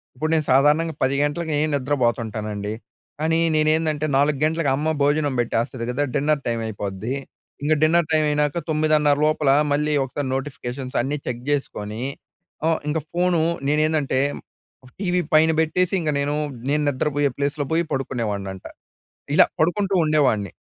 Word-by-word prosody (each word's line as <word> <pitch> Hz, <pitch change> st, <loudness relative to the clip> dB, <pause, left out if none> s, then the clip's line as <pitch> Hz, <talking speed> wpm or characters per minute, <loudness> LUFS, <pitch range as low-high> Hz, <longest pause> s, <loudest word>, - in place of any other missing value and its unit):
ఇప్పుడు 155 Hz, +5 st, -2 dB
నేను 155 Hz, -2 st, +1 dB
సాధారణంగా 150 Hz, +4 st, +3 dB
10:00 130 Hz, +1 st, +2 dB
గంటలకి 150 Hz, +1 st, -1 dB, 0.2 s
నిద్రపోతుంటానండి. 110 Hz, -6 st, -1 dB, 0.5 s
కానీ 160 Hz, +1 st, +2 dB, 0.2 s
నేనేందంటే, 155 Hz, 0 st, +1 dB
4:00 145 Hz, 0 st, +2 dB
గంటలకు 160 Hz, -1 st, 0 dB
అమ్మ 150 Hz, +3 st, -2 dB, 0.2 s
భోజనం 145 Hz, 0 st, +2 dB
పెట్టేస్తది 115 Hz, +1 st, -2 dB
కదా! 135 Hz, +4 st, 0 dB
డిన్నర్ 150 Hz, 0 st, +1 dB
టైమ్ 115 Hz, -1 st, -1 dB
అయిపోద్ది. 105 Hz, +3 st, -4 dB, 0.5 s
ఇంగా 155 Hz, +2 st, +3 dB
డిన్నర్ 165 Hz, +1 st, +3 dB
టైమ్ 155 Hz, -1 st, +3 dB
అయినాక 150 Hz, +1 st, 0 dB
9:30 155 Hz, -2 st, +3 dB
లోపల 155 Hz, -2 st, +2 dB, 0.2 s
మళ్ళీ 150 Hz, +1 st, +1 dB
ఒకసారి 135 Hz, +1 st, -4 dB
నోటిఫికేషన్స్ 130 Hz, -1 st, -5 dB
అన్నీ 140 Hz, +4 st, -2 dB
చెక్ 120 Hz, -1 st, -4 dB
చేసుకొని, 110 Hz, -5 st, -3 dB, 0.6 s
హ్మ్. 165 Hz, 0 st, +2 dB
ఇంక 155 Hz, +2 st, 0 dB
ఫోన్ 175 Hz, 0 st, +1 dB, 0.3 s
నేనేందంటే, 150 Hz, -2 st, +1 dB, 0.8 s
టీవీ 180 Hz, -2 st, +1 dB
పైన 160 Hz, +1 st, +5 dB
పెట్టేసి 180 Hz, +3 st, 0 dB
ఇంక 160 Hz, -, -1 dB
నేను. 145 Hz, +1 st, 0 dB, 0.4 s
నేను 150 Hz, +1 st, +2 dB
నిద్రపోయే 145 Hz, +1 st, 0 dB
ప్లేస్‌లో 145 Hz, +1 st, -1 dB
పోయి 165 Hz, +1 st, +2 dB
పడుకునేవాడిని 115 Hz, -7 st, -2 dB
అంటా. 95 Hz, -, -10 dB, 0.7 s
ఇలా -, -, +7 dB
పడుకుంటూ 195 Hz, +5 st, +1 dB
ఉండేవాడిని. 130 Hz, -, +2 dB
145 Hz, 135 wpm, -22 LUFS, 130-155 Hz, 0.8 s, ఇలా